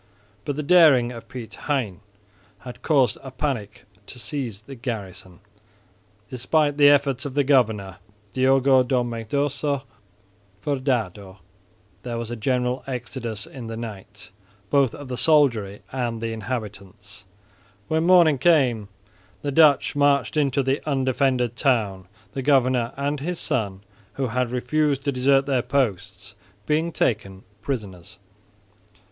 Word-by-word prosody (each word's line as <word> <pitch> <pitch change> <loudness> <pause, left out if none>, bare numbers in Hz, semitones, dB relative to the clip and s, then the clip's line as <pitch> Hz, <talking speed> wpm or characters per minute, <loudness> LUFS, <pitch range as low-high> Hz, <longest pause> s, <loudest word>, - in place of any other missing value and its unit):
But 145 - -2
the 150 - -3
daring 145 -7 +5
of 115 -2 -10
Piet 120 -3 -8 0.2
Hein 120 -11 -1 0.6
had 125 -1 -10
caused 135 -4 +2
a 135 - -8
panic 125 -7 -4 0.2
to - - -9
seize 115 -2 -5
the 135 +5 -11
garrison. 100 -7 -7 0.9
Despite 145 +5 0
the 145 -1 +7
efforts 140 -2 +2
of 140 -3 -6
the 145 - +3
governor, 110 -9 +1 0.4
Diogo 130 0 +4
de 130 +1 0
Mendoça 130 +4 -1 0.8
Furdado, 110 -7 -2 0.6
there 120 +1 -5
was 115 0 -5
a - - -3
general 125 +2 -1
exodus 120 -3 -5
in 125 -4 -9
the 115 0 -6
night, 105 -2 -9 0.4
both 140 -4 +3
of 145 - -9
the 125 -1 -5
soldiery 115 -11 +2
and 120 -3 -2
the 115 0 -3
inhabitants. 105 -2 -7 0.6
When 160 +1 +1
morning 170 -5 +5
came 125 -10 +3 0.5
the 145 - -1
Dutch 145 -2 +4
marched 145 -3 +2
into 140 -2 +1
the 135 +2 0
undefended 130 -3 +1
town, 105 -10 0 0.3
the 135 - -3
governor 130 -3 +2
and 140 +1 -2
his 170 +4 -4
son, 100 -5 -2 0.3
who 135 -3 -2
had 125 +1 -1
refused 140 +3 0
to 140 - 0
desert 135 +1 +3
their 135 -3 +1
posts, 110 -7 -2 0.3
being 160 +3 0
taken 100 -9 -1 0.2
prisoners. 100 -10 -6
125 Hz, 130 wpm, -23 LUFS, 110-140 Hz, 0.9 s, the